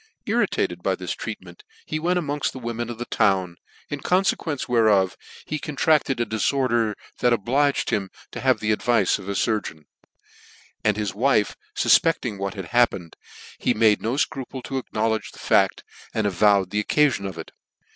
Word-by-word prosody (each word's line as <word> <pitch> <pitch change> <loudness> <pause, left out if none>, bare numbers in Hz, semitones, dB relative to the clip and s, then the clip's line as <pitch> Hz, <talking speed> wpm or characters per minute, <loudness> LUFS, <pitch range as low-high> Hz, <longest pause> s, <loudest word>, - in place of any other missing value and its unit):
Irritated - - 0
by - - 0
this - - -5
treat - - -5
ment 420 - -14 0.2
v - - -2
ie - - -4
went 175 +3 +1
among 145 -4 -2
the - - -8
women 120 -1 -4
of 120 - -6
the 120 - -5
town, 95 -7 +1 0.3
in 145 - -5
coniequence 180 -5 0
whereof 110 -6 +3 0.3
he 155 - -3
contracted 150 -2 +1
a 120 - +1
dilorder 115 0 0 0.2
that 125 - +3
obligrd 135 +6 +1
him 100 -4 -1 0.2
to - - -6
have - - +2
the 110 0 +1
advice 105 -3 +2
ot 100 - -10
a - - -1
furgeon: 100 -8 -1 1.0
and 105 -2 +2
his 105 -1 -1
wiiv 110 -2 +2 0.2
fufpecting 120 -11 +3
what 100 0 -3
had 95 -3 -7
happened, 100 -9 +2 0.4
he 125 - +1
made 110 -1 +4
no 115 +4 -1
Icropir 135 -2 -3
to 135 - -3
acknowledge 110 -3 -2
the - - -15
fact, - - +2 0.3
and 110 - 0
avow 100 0 +3
the 105 +3 -2
occafi;>n 140 -7 +2
of 95 -3 -8
it. 80 - -8
115 Hz, 175 wpm, -23 LUFS, 100-135 Hz, 1.0 s, made